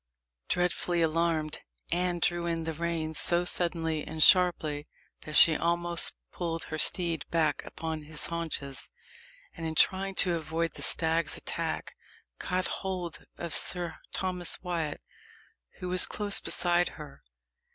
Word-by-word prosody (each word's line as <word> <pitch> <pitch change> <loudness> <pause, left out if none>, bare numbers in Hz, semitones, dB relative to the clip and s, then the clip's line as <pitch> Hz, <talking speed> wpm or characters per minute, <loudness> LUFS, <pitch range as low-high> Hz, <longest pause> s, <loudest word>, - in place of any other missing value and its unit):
Dreadfully 175 -1 +1
alarmed, 160 -1 0 0.3
Anne 175 0 0
drew 175 0 0
in 165 -1 -1
the 160 0 -3
rein 165 0 -2
so 175 +3 +3
suddenly 165 -3 0
and 155 0 0
sharply, 160 -5 +4 0.4
that 155 - -5
she 160 +1 +8
almost 170 +1 +1 0.2
pulled 165 -2 -3
her 155 - -5
steed 170 -4 0
back 155 -4 +1
upon 160 -1 -5
his 150 0 -2
haunches; 160 -5 -3 0.7
and 165 - -8
in 160 -1 -3
trying 195 +4 +2
to 180 -1 +3
avoid 165 0 -2
the - - -8
stag's 165 -1 +3
attack, - - -4 0.5
caught 185 0 -1
hold 180 -5 -4
of 170 -2 -5
Sir 175 -2 0
Thomas 180 -2 -1
Wyat, 165 -5 -3 0.8
who 180 - -5
was 180 0 +4
close 205 -1 +1
beside 175 -1 +2
her. 150 -3 -11
170 Hz, 135 wpm, -29 LUFS, 160-175 Hz, 0.8 s, she